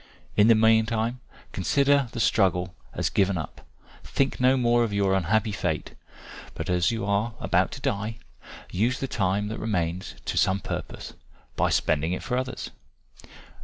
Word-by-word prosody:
In 105 +1 +5
the 115 - +7
meantime 110 +2 +2 0.3
consider 140 +6 +2
the 120 - -5
struggle 95 -5 +2 0.2
as - - -2
given 95 -1 +2
up; 80 -3 -7 0.4
think 135 - -1
no 130 +1 +4
more 120 -1 +3
of 115 - -1
your 100 -1 +1
unhappy 105 +4 +1
fate, 90 -6 -3 0.6
but - - -3
as 90 0 +2
you 110 -3 -2
are 105 +3 0
about - - +2
to - - -8
die, 110 +3 -2 0.5
use 120 +8 0
the 135 - -2
time 100 -2 0
that 110 - -5
remains, 90 -4 -2
to - - -3
some 95 -1 +2
purpose, - - -6 0.4
by - - +2
spending 80 +3 +1
it 90 - -4
for 125 - -2
others. 130 0 -3
105 Hz, 160 wpm, -26 LUFS, 95-115 Hz, 0.6 s, the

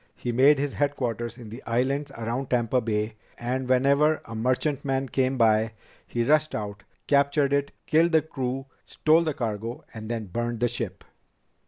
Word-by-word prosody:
He 120 - -3
made 135 +5 +5
his 140 0 -1
headquarters 120 -5 -2
in 115 -4 -10
the 115 - -8
islands 135 +5 0
around 120 +3 -3
Tampa 125 0 +2
Bay, 110 -1 -1 0.2
and 125 +2 -2
whenever 140 +4 +4
a 115 - -9
merchantman 135 +3 0
came 130 +1 +1
by, 110 -1 +3 0.3
he 120 - -1
rushed 155 +4 +2
out, 105 -2 -5 0.2
captured 140 0 +3
it, 140 0 +1
killed 165 +2 +3
the 160 -2 +5
crew, 135 -3 -3 0.2
stole 160 +2 +3
the 155 -4 -2
cargo, 115 -2 -4
and 110 -2 -7
then 115 -2 -2
burned 120 +4 -3
the 120 - +3
ship." 120 +1 -5
125 Hz, 165 wpm, -26 LUFS, 115-140 Hz, 0.3 s, made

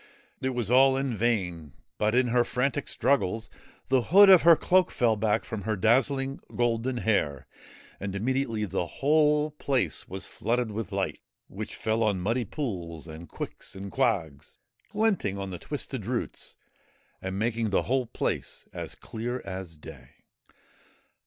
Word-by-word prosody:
It 130 -1 -1
was 120 -3 -1
all 135 +1 +6
in 135 -3 -1
vain, 90 - -1 0.3
but, 105 +2 +2
in 125 -1 +3
her 120 +1 +4
frantic 130 +4 -1
struggles, 115 -5 0 0.4
the 130 -1 +4
hood 195 +9 +7
of 185 - +9
her 170 0 +8
cloak 185 +3 +3
fell 115 -3 +2
back 105 0 +1
from 110 -2 -5
her 110 +3 -1
dazzling 135 +6 +2 0.2
golden 120 +1 0
hair, 85 - 0 0.5
and 100 0 -4
immediately 115 0 0
the 90 -2 -2
whole 150 - +2
place 140 -3 -1
was 95 +1 -6
flooded 120 -1 -1
with 105 -3 -4
light, - - -2 0.3
which - - -6
fell 110 +1 -1
on 105 -4 +2
muddy 115 +6 0
pools 85 - -5
and 80 +1 -10
quicks - - -6
and 95 0 -7
quags, 95 - -1 0.3
glinting 205 - 0
on 95 -1 -5
the 90 - -6
twisted 135 -6 -5
roots 120 -1 -4 0.6
and 95 0 -4
making 115 +1 0
the 100 - +2
whole 130 0 0
place - - -3
as - - -6
clear 120 +3 -5
as 95 -4 -6
day. 75 - -12
115 Hz, 150 wpm, -27 LUFS, 100-130 Hz, 0.6 s, of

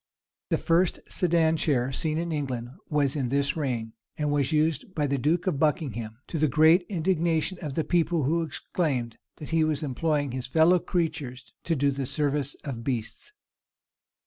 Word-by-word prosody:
The - - +2
first 170 +1 +2
sedan 165 -2 +2
chair 130 -5 +1
seen 155 +3 -1
in 170 +1 -2
England 130 -6 -3 0.2
was 145 -2 +1
in 135 -5 -1
this 140 +1 +1
reign, 120 -7 -2 0.2
and 150 -1 0
was 140 -2 +1
used 155 +3 0
by 150 -3 +1
the 140 -1 0
duke 165 +7 +1
of 180 -8 0
Buckingham; 125 - -1
to 165 - -4
the 155 - +4
great 160 +6 +5
indignation 170 -1 0
of 145 -5 -5
the 160 - +1
people, 170 -2 +1
who 165 +5 +1
exclaimed, 140 -6 -2 0.2
that 150 - -9
he 165 -1 +3
was 155 -1 0
employing 145 0 0
his 125 -1 -4
fellow 165 +6 +4
creatures 155 -8 -3
to 165 - +1
do 140 0 +2
the 135 -1 -3
service 145 -1 -1
of 125 -6 -5
beasts. 120 - -4
150 Hz, 170 wpm, -27 LUFS, 135-165 Hz, 0.2 s, great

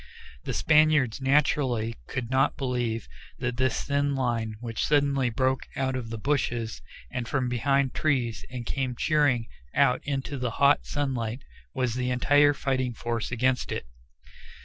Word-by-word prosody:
The - - -2
Spaniards 155 -6 +3
naturally 130 -5 +2
could 130 -3 -4
not 130 +1 +2
believe 120 -4 -2 0.3
that 125 -1 -3
this 130 0 +1
thin 140 0 0
line 115 -4 -1
which 115 -1 -3
suddenly 140 -3 +2
broke 130 +3 0
out 130 -1 -1
of 120 -3 -4
the 115 - -4
bushes 120 -3 -1 0.3
and 125 -2 -3
from 130 -1 0
behind 135 +2 +1
trees 120 -9 0
and 125 -2 -6
came 130 0 -2
cheering 145 -5 +2 0.3
out 125 - +3
into 140 0 -3
the 125 -1 -1
hot 140 +1 +4
sunlight 130 -4 -2 0.3
was 125 -3 0
the 125 0 -1
entire 145 +3 +4
fighting 130 -3 -1
force 115 0 -3
against 125 +1 0
it. - - -3
130 Hz, 150 wpm, -27 LUFS, 120-140 Hz, 0.3 s, hot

